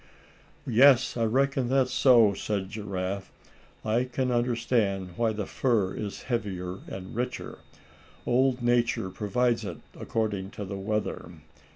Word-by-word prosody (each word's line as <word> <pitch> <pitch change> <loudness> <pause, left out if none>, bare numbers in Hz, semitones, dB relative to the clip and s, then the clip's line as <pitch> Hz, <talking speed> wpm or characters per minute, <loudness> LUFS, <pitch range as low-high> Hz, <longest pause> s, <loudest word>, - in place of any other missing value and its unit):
"Yes, 130 +1 +5
I 115 -2 +1
reckon 135 +2 +1
that's 130 -1 +2
so," 120 -6 +6
said 100 -1 -3
Giraffe, 100 -2 -4 0.5
"I 115 +3 +1
can 130 0 -1
understand 115 -5 0
why 115 -1 +1
the 105 -2 -3
fur 110 -7 0
is 105 -2 -5
heavier 95 -7 -3
and 95 +1 -8
richer. 125 +2 -4 0.7
Old 130 0 +2
Nature 120 -5 +1
provides 115 +4 0
it 90 -5 -5 0.2
according 105 -4 -2
to 105 - -4
the 100 +1 -5
weather. 105 +2 -3
115 Hz, 130 wpm, -27 LUFS, 100-125 Hz, 0.7 s, so